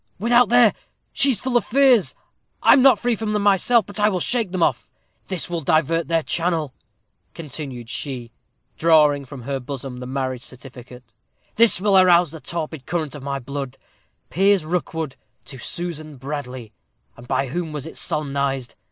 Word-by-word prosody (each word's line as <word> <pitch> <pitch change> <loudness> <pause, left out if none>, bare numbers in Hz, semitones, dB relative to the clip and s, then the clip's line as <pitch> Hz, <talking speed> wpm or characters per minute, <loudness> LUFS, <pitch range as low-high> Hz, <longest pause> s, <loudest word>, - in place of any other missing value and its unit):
without 240 +4 +4
there! 240 -2 +5 0.4
She 280 - +3
is 250 - +1
full 255 -1 -2
of - - +1
fears. 255 -5 +3 0.5
I - - +8
am 265 - +5
not 260 -4 +6
free 245 +2 0
from 215 0 -3
them 210 -1 0
myself, 205 +3 +3
but 205 0 -5
I 210 +1 +4
will 185 -3 -1
shake 225 0 0
them 185 -2 0
off. - - 0 0.4
This 185 -4 -3
will 170 -1 -3
divert 160 +3 +1
their 165 -1 +1
channel," 165 -5 -1 0.6
continued 135 -6 -7
she, 125 -2 -6 0.5
drawing 150 -4 +4
from 130 -1 -10
her 135 +2 -3
bosom 130 -1 -7
the 125 0 -7
marriage 130 -1 -3
certificate. 125 -2 -10 0.4
"This 230 -4 +5
will 200 0 +2
arouse 175 -3 +5
the 160 - -9
torpid 160 -4 -5
current 160 -3 -2
of 145 - -8
my 140 0 -3
blood 135 0 -6 0.5
'Piers 195 -1 +3
Rookwood 160 -4 -3 0.3
to 130 - -9
Susan 155 -1 -5
Bradley.' 130 -4 -6 0.4
And 120 - -14
by 135 0 0
whom 170 +3 -3
was 150 -2 -5
it 165 - -9
solemnized? 140 -3 -2
155 Hz, 170 wpm, -22 LUFS, 135-190 Hz, 0.6 s, I